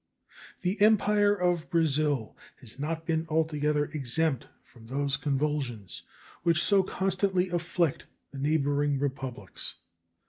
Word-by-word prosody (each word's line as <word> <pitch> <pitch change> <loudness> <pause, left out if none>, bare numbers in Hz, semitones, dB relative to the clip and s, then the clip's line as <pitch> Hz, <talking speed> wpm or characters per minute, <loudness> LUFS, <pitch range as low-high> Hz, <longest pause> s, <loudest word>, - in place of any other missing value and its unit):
The 185 +3 -1
Empire 210 -1 +4
of 175 -3 0
Brazil 150 -7 +1 0.2
has 125 0 -8
not 160 +2 -3
been 165 0 0
altogether 150 -2 +1
exempt 145 -1 -1 0.2
from 115 -1 -17
those 140 +2 0
convulsions 140 - -2 0.4
which 170 -1 +2
so 200 -2 +4
constantly 190 0 0
afflict 170 -2 -1 0.2
the 140 - -8
neighboring 145 -1 +1
republics. 130 -8 -4
155 Hz, 110 wpm, -29 LUFS, 140-175 Hz, 0.4 s, Empire